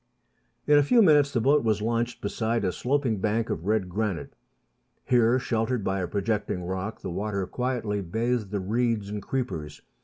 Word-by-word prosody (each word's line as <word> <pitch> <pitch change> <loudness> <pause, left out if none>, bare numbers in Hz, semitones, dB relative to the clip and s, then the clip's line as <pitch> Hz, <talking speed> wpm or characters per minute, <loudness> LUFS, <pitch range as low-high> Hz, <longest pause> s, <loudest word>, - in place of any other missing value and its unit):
In 150 0 +6
a - - +4
few 230 - +5
minutes 145 -5 +5
the 120 - +1
boat 140 +5 +3
was 110 -2 +1
launched 115 +2 -1
beside 110 +1 -1
a 90 - +1
sloping 125 -2 0
bank 110 +3 0
of 80 +4 -4
red 105 -3 +1
granite. 100 -1 -3 0.7
Here, 120 0 +4
sheltered 115 -2 -1
by 95 0 -1
a 90 - -2
projecting 100 -2 -2
rock, 95 +4 -4
the 95 - -5
water 100 +1 -2
quietly 120 -3 -2
bathed 110 +3 -1
the 100 -1 -2
reeds 110 0 0
and 105 0 -4
creepers. 80 - -4
110 Hz, 175 wpm, -26 LUFS, 100-125 Hz, 0.7 s, In